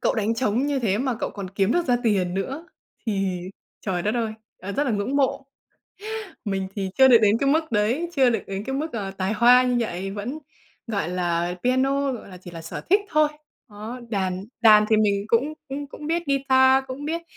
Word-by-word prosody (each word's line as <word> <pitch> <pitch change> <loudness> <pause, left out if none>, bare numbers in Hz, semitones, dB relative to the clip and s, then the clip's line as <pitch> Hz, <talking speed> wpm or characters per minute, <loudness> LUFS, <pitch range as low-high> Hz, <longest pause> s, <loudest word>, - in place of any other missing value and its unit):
cậu - - +1
đánh 220 +1 0
trống 245 +3 0
như 285 -2 0
thế 210 -4 0
mà 260 -1 0
cậu - - -2
còn 195 -3 -7
kiếm 195 +3 +1
được 350 -1 +1
ra 245 -2 +3
tiền 190 -5 +1
nữa 270 - -4 0.4
thì, 195 -4 -1 0.4
trời 180 -3 -2
đất 210 +3 0
ơi, 225 -2 -1 0.3
à, 195 +2 -6
rất 290 +7 0
là 255 - 0
ngưỡng 210 +6 -1
mộ! 275 0 +1 1.0
Mình 195 -1 -2
thì 190 -1 -2
chưa 265 - +8
được 240 -3 +8
đến 210 +2 +4
cái 275 - +1
mức 315 -2 +1
đấy, 230 +11 +1
chưa 260 -2 +5
được 225 -4 -1
đến 195 +1 -5
cái 265 +2 -3
mức, 305 +2 -3
ờ, 200 -4 -3
tài 190 +1 -2
hoa 245 +3 +6
như 250 -1 +1
vậy, 195 -3 -3
vẫn, 215 +9 -5 0.5
gọi 200 -8 -2
là, 175 -1 -1
piano, 270 +2 +1
gọi 235 - -8
là, 185 - -10
chỉ 180 0 -11
là 165 -1 -9
sở - - -6
thích 400 +2 +6
thôi. 305 0 +3 0.4
Đó, 220 +5 -7
đàn 190 -2 -2 0.2
đàn 215 -2 +7
thì 220 - +5
mình 200 -2 +2
cũng 255 +6 +2 0.2
cũng 285 +2 -5
cũng 300 - -9
biết 335 +2 0
guitar, 265 -1 +4
cũng 265 +2 -7
biết 335 +2 -2
225 Hz, 220 wpm, -24 LUFS, 195-270 Hz, 1.0 s, chưa